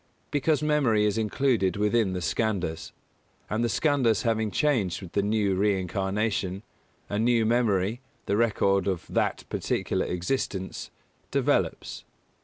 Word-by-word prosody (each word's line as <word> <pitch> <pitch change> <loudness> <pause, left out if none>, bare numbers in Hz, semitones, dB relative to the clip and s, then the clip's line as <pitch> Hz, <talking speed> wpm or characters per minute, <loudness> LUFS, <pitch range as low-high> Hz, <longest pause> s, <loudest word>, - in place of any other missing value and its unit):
Because 145 0 +1
memory 135 -9 +2
is 105 +1 +1
included 110 -3 +1
within 105 -1 +2
the 90 - -3
Skandhas; 90 -6 -2 0.6
and 110 +2 0
the 120 - +1
Skandhas 130 -5 +2
having 110 -2 +1
changed 115 - +1
with 95 -4 -10
the 100 - +1
new 105 -1 +1
reincarnation, 95 0 -1 0.4
a 105 - -2
new 115 0 +3
memory, 110 -1 +1 0.2
the 100 - 0
record 100 -4 +2
of 95 -3 -1
of - - -12
that - - 0
particular - - -1
existence, 95 +1 -3 0.4
develops. - - 0
105 Hz, 130 wpm, -27 LUFS, 95-115 Hz, 0.6 s, new